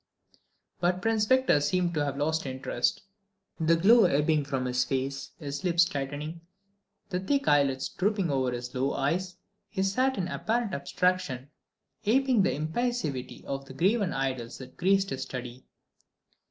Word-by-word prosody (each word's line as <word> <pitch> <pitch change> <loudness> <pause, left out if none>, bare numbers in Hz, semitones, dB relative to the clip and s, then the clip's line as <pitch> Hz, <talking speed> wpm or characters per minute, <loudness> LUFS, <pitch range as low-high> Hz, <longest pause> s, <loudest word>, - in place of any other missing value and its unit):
But 180 +1 +1
Prince 220 +1 +1
Victor 260 - +4
seemed 175 +4 +1
to 150 -2 +1
have 140 -1 -2
lost 160 +1 0
interest. 130 -2 -1 0.6
The 165 +1 +4
glow 215 +6 +6
ebbing 150 -2 +2
from 135 -2 -2
his 125 0 +1
face, 135 +1 -3
his 140 -2 -5
lips 170 -1 +4
tightening, 145 +2 -4 0.7
the 180 - 0
thick 275 +9 0
lids 140 -2 +3
drooping 195 -2 0
low 135 -2 +1
over - - 0
his 125 0 -5
eyes, 145 +7 0 0.3
he 190 - -1
sat 255 +7 +1
in 180 -2 -1
apparent 225 +3 -1
abstraction, 145 -2 -1 0.5
aping 255 +1 +3
the 195 - +2
impassivity 155 - -2
of 135 0 -4
the 135 -1 -11
graven 195 - +2
idols 130 -3 -3
that 130 -1 -11
graced 195 +2 +2
his 135 - -3
study. 125 -1 -6
155 Hz, 150 wpm, -28 LUFS, 135-190 Hz, 0.7 s, glow